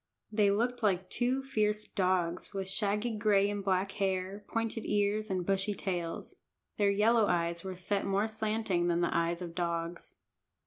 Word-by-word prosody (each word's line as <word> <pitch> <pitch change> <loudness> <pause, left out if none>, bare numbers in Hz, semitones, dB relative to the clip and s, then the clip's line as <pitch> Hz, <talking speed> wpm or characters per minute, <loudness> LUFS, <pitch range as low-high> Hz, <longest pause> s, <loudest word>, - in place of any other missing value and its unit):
They 210 -2 +3
looked 240 +5 0
like 190 -3 +1
two 255 +2 +1
fierce 215 -5 0
dogs, 185 -1 0
with 195 -1 -2
shaggy 210 +3 0
gray 205 -2 +3
and 205 -1 -3
black 190 0 +1
hair, 195 +1 -2
pointed 225 0 -2
ears, 210 +1 0
and 185 -2 -1
bushy 195 +2 0
tails. 175 -4 -4 0.4
Their 205 -1 +3
yellow 215 +2 +4
eyes 170 -1 0
were 190 -1 -5
set 195 +2 -1
more 200 +2 +1
slanting 215 -5 0
than 170 0 +2
the 170 - 0
eyes 170 +1 0
of 170 -1 -7
dogs. 170 -1 -3
200 Hz, 165 wpm, -31 LUFS, 180-215 Hz, 0.4 s, yellow